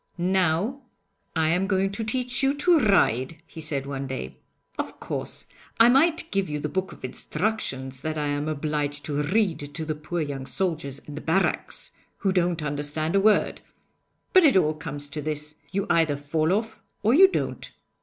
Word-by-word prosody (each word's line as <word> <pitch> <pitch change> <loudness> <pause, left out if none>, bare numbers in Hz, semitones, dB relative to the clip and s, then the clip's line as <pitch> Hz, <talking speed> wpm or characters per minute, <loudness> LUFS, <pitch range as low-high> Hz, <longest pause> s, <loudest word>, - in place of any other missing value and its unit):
'Now 185 - +1 0.5
I 160 -1 +2
am 180 +4 +2
going 195 -1 +1
to 200 +3 -3
teach 250 +3 0
you 270 +1 +3
to 335 +3 +4
ride,' 165 - +3
he 165 - -10
said 145 -3 -1
one 140 -1 -4
day. 130 - -6 0.4
'Of - - -4
course, - - -4 0.3
I 230 +1 +8
might 325 +6 +3
give 195 -3 0
you 150 0 -2
the 150 - -2
book 190 +4 -2
of - - -8
instructions 130 - -3
that 155 0 -3
I 150 - -1
am 145 +1 -1
obliged 150 -1 -2
to 145 -1 -1
read 185 +3 +1 0.2
to 160 - -2
the 155 - -1
poor 155 +3 -4
young 140 -3 -4
soldiers 160 -7 -2
in 150 - -11
the 150 - -6
barracks, 185 +4 0 0.3
who 195 - +1
don't 175 -3 +1
understand 150 +3 -2
a - - +6
word; 215 +1 +3 0.7
but 370 - +8
it 280 -10 +6
all 155 -4 +3
comes 145 -2 -6
to 150 - -4
this 150 0 -3 0.2
you 195 0 -1
either 165 -4 +3
fall 155 +3 0
off 220 +3 -1 0.2
or 220 +3 +4
you 380 +7 +9
don't. 380 - -3
160 Hz, 185 wpm, -26 LUFS, 145-200 Hz, 0.7 s, you